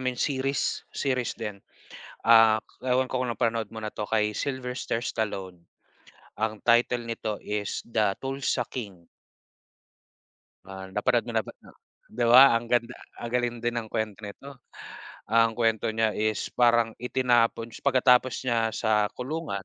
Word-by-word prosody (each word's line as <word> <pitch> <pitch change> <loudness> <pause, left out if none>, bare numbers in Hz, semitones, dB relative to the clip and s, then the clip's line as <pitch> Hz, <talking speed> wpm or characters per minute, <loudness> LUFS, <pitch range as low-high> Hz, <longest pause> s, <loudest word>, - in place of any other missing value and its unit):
mean, 130 -1 -2
series. 135 +1 -1 0.2
Series 130 -4 -1
din. 105 -4 -6 0.6
Ah, 115 -1 +6 0.2
ewan 130 0 0
ko 130 - -1
kung 130 - -1
napanood 115 -2 -1
mo 110 - -6
na 105 - -4
'to 105 - -5
kay 105 -1 +1
Sylvester 125 -1 -3
Stallone. 95 -7 -4 0.7
Ang 110 -1 -2
title 120 0 +3
nito 115 -2 -4
is 105 -1 -3
The 105 -4 0
Tulsa 135 -2 -2
King. 100 -9 -8 1.6
Ah, 95 0 -8
napanood 120 +3 +1
mo 120 - -5
na 110 - +2
ba - - -12 0.2
ah - - -16 0.4
'di 120 +1 -1
ba 130 +2 +8
ang 120 - -11
ganda 120 +1 +1 0.2
ang 120 0 -6
galing 120 -1 0
din 120 - +1
ng 110 - -11
kwento 110 -2 -3
nito. 130 +6 -10 0.7
Ang 115 0 +4
kuwento 115 -2 +1
niya 110 -1 +1
is 110 0 -2
parang 120 -2 +3
itinapon 120 -2 +1
s - - -11
pagkatapos 130 -2 +4
niya 115 -2 +1
sa 105 -2 +1
kulungan 130 -6 -4
115 Hz, 150 wpm, -26 LUFS, 110-125 Hz, 1.6 s, ba